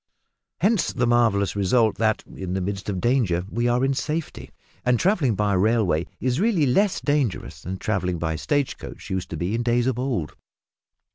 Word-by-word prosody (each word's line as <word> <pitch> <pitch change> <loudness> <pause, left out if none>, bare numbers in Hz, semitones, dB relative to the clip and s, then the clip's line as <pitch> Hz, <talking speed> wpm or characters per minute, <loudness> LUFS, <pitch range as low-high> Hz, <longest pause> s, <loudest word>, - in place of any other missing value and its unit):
Hence 205 +2 +2
the 125 -2 0
marvellous 115 -5 +2
result 110 +3 +2
that, 110 -1 +1
in 90 -1 -6
the 95 - 0
midst 100 +2 -4
of 95 -3 -2
danger, 105 -7 +1
we 120 +1 0
are 120 +2 +2
in 135 - +1
safety, 155 +3 -4 0.3
and 125 -2 +2
travelling 170 - +2
by 100 +1 +1
railway 95 -4 +2
is 130 +2 0
really 200 -7 +2
less 195 +10 +2
dangerous 125 - -1
than 95 +2 -5
travelling 90 -4 -1
by 80 -1 -2
stage 145 - -1
coach - - -9
used 95 -1 -2
to 80 - -5
be 85 +6 -2
in 115 - 0
days 120 0 +1
of 130 -2 0
old. 125 - -2
115 Hz, 185 wpm, -24 LUFS, 95-130 Hz, 0.3 s, Hence